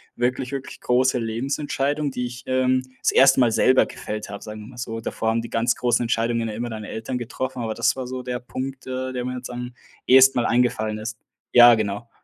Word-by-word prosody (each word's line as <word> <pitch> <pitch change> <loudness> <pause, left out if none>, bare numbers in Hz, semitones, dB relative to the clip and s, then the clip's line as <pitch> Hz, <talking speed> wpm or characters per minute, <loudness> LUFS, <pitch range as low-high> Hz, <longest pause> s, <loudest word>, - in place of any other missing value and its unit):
wirklich 125 +2 -1
wirklich 135 -1 -6
große 130 +1 +2
Lebensentscheidung, 140 +5 -2
die 125 -1 -3
ich, 125 +1 -9
ähm, 130 0 +2 0.2
das - - +2
erste 135 0 +6
Mal 120 -2 +4
selber 130 +3 +4
gefällt 105 -1 -6
habe, 100 - -8
sagen 105 0 -8
wir 105 - -10
mal 125 - -14
so. 115 -2 -5
Davor 110 0 -2
haben 115 0 0
die 115 - -8
ganz 115 +1 +1
großen 120 0 +1
Entscheidungen 115 0 0
ja - - -5
immer 120 +1 -4
deine 110 -1 -7
Eltern 115 +3 -4
getroffen, 125 +1 -4
aber 110 -1 -2
das - - +1
war 130 - -4
so 130 0 -5
der 125 -1 -3
Punkt, 130 +1 -6
äh, 130 0 -3
der 125 -1 -3
mir 125 0 -3
jetzt 125 - -7
am 125 0 -6 0.3
ehesten 130 0 +7
Mal - - 0
eingefallen 115 -3 +1
ist. 110 0 -6 0.4
Ja, 120 0 +9
genau. 110 +2 -3
125 Hz, 220 wpm, -23 LUFS, 115-130 Hz, 0.4 s, Ja